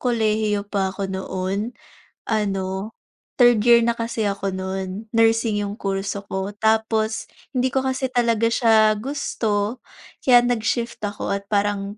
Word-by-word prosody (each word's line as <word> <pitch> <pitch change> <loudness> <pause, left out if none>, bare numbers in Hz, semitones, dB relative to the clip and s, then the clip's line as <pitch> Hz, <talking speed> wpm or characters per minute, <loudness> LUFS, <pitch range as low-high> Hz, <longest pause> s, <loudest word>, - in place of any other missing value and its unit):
kolehiyo 215 -4 +1
pa 200 -2 -1
ako 195 +1 -4
noon, 190 +4 -3 0.5
ano 195 -1 -2 0.4
third 240 -3 +4
year 235 -1 +7
na 235 0 +1
kasi 230 -2 -1
ako 195 -1 -3
nun, 190 +3 -5
nursing 225 -1 +2
yung 200 - -4
kurso 195 -1 -3
ko 190 +1 -3
tapos, 220 0 +1 0.2
hindi 255 -1 -1
ko 265 - +2
kasi 265 0 -1
talaga 230 -2 +2
siya 225 -2 +4
gusto, 225 -4 -2 0.4
kaya 245 -2 +6
nag-shift 240 0 -1
ako 205 -1 -3
at 200 0 -5
parang 205 0 -1
215 Hz, 135 wpm, -22 LUFS, 200-230 Hz, 0.5 s, year